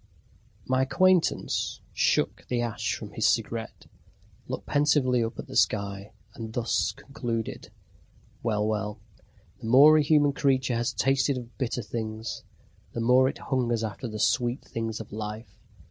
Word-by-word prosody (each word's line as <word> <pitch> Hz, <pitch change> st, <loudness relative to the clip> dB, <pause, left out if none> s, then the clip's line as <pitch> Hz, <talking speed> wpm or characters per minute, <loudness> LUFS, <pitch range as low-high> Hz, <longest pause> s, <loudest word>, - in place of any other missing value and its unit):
My 130 Hz, 0 st, +2 dB
acquaintance 185 Hz, +6 st, +2 dB
shook -, -, +1 dB
the 125 Hz, -, -1 dB
ash 115 Hz, -1 st, -1 dB
from 105 Hz, -2 st, -8 dB
his 105 Hz, 0 st, +1 dB
cigarette, 115 Hz, 0 st, -1 dB, 0.6 s
looked -, -, -5 dB
pensively 145 Hz, -4 st, +2 dB
up 115 Hz, -, -4 dB
at -, -, -6 dB
the -, -, -10 dB
sky, 100 Hz, 0 st, +1 dB, 0.2 s
and 110 Hz, -1 st, -7 dB
thus 120 Hz, 0 st, 0 dB
concluded: 120 Hz, -5 st, -5 dB, 0.7 s
Well, 105 Hz, -3 st, 0 dB
well, 105 Hz, 0 st, -2 dB, 0.6 s
the -, -, -7 dB
more 145 Hz, +6 st, +8 dB
a -, -, +5 dB
human 145 Hz, -1 st, +3 dB
creature 130 Hz, -2 st, +1 dB
has 120 Hz, +1 st, 0 dB
tasted 135 Hz, 0 st, +1 dB
of 120 Hz, -1 st, -9 dB
bitter 125 Hz, -2 st, -2 dB
things 110 Hz, +1 st, -5 dB, 0.5 s
the -, -, -3 dB
more 125 Hz, +3 st, +4 dB
it -, -, -6 dB
hungers 120 Hz, -3 st, +1 dB
after 110 Hz, +3 st, -4 dB
the 110 Hz, -1 st, -6 dB
sweet 120 Hz, +4 st, +1 dB
things 115 Hz, -1 st, -4 dB
of 110 Hz, -, -9 dB
life. 110 Hz, +2 st, -7 dB
115 Hz, 145 wpm, -27 LUFS, 110-130 Hz, 0.7 s, more